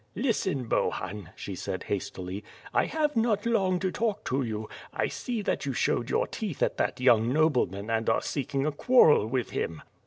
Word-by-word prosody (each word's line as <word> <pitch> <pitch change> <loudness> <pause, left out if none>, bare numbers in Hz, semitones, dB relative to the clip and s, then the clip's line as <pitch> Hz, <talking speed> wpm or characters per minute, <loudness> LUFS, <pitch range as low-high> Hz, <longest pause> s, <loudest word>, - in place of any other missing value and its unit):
"Listen, 190 - 0
Bohun," 105 -4 -2
she 100 - -6
said 95 0 -4
hastily, 95 0 -4 0.3
"I - - +3
have 300 -3 0
not 225 -2 +2
long 195 -6 +2
to 185 - 0
talk 215 -1 -1
to 135 +2 0
yen; 110 -3 -3 0.3
I - - 0
saw 235 -4 -3
that 145 - -1
you 135 - -1
showed 120 0 0
your - - +2
teeth 200 - -3
at - - 0
that - - 0
young 120 -2 +4
nobleman 125 - +1
and 115 0 +1
are 110 - +3
seeking 140 0 -2
a 155 - +1
quarrel 150 - +5
with 125 0 -1
him." 80 -2 -3
135 Hz, 185 wpm, -28 LUFS, -, 0.3 s, quarrel